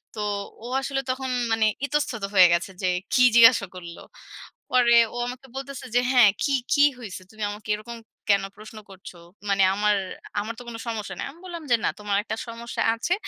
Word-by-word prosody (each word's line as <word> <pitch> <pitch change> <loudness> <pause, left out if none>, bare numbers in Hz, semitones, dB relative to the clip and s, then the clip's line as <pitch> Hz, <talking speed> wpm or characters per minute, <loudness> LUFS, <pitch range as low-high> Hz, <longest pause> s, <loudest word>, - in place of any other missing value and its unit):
তো 210 - -4 0.4
ও - - -5
আসলে 270 0 -2
তখন 260 0 -4 0.2
মানে 225 -1 +2 0.2
ইতস্তত 280 -7 -2
হয়ে 185 -2 +8
গেছে 175 +3 -1
যে, 185 - +1 0.2
"কী 250 - +5
জিজ্ঞাসা 230 -3 +7
করলো?" 170 -1 -9 0.7
পরে 240 -2 +5 0.2
ও - - -4
আমাকে 255 +2 -8
বলতেছে, 270 -1 -6
যে 245 - +5
হ্যাঁ, 245 -5 +7
"কী, 280 - +1 0.2
কী 285 0 +5 0.2
হইছে? 195 -5 -8
তুমি 215 -1 -7
আমাকে 210 +1 -10
এরকম 235 +3 -9 0.3
কেন 200 -1 +4
প্রশ্ন 215 +1 -12
করছো? 190 -2 -12 0.3
মানে 195 -1 +3
আমার 210 0 +2 0.5
আমার 225 +2 -5
তো - - -9
কোনো 230 -1 -7
সমস্যা 220 -3 -4
নাই।" - - -3
আমি 330 - -19
বললাম 340 -3 -7
যে, - - +7
"না - - +3
তোমার 205 -1 -1
একটা 220 - -4
সমস্যা 230 +1 -5
আছে 345 +10 -1
230 Hz, 190 wpm, -24 LUFS, 205-255 Hz, 0.7 s, হয়ে